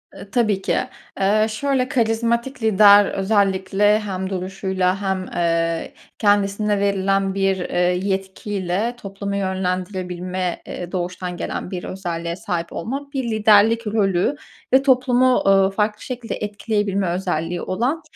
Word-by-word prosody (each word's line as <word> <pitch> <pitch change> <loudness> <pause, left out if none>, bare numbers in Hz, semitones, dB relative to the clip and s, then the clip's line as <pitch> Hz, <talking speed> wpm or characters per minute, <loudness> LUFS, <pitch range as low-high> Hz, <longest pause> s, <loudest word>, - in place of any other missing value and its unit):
Eee, 200 - -11
tabii 215 -6 +1
ki. - - 0 0.4
Eee, 210 +3 +3
şöyle, 255 +3 0
karizmatik 235 +2 0
lider 205 -1 +7
özellikle 195 +1 +2
hem 190 -3 -4
duruşuyla 190 0 -1
hem, 190 -1 -1
eee, 165 -1 0 0.3
kendisine 205 0 +2
verilen 195 -1 +1
bir, 195 -1 +1
eee, 180 - -3
yetkiyle 190 +3 -1
toplumu 200 0 -5
yönlendirebilme, 185 -1 -3
eee, 175 0 -6
doğuştan 180 -1 -4
gelen - - -4
bir 180 -2 -4
özelliğe 170 -3 -4
sahip 175 -2 -4
olmak 275 - -5
bir 270 -1 -1
liderlik 220 +1 +4
rolü 200 +3 +1 0.4
ve 265 +1 +6
toplumu, 255 -1 +3
ııı, 195 0 +5
farklı 210 +1 -1
şekilde 245 -3 -5
etkileyebilme 205 -2 -1
özelliği 175 -1 -2
olan, 250 - -1
195 Hz, 120 wpm, -21 LUFS, 185-215 Hz, 0.4 s, lider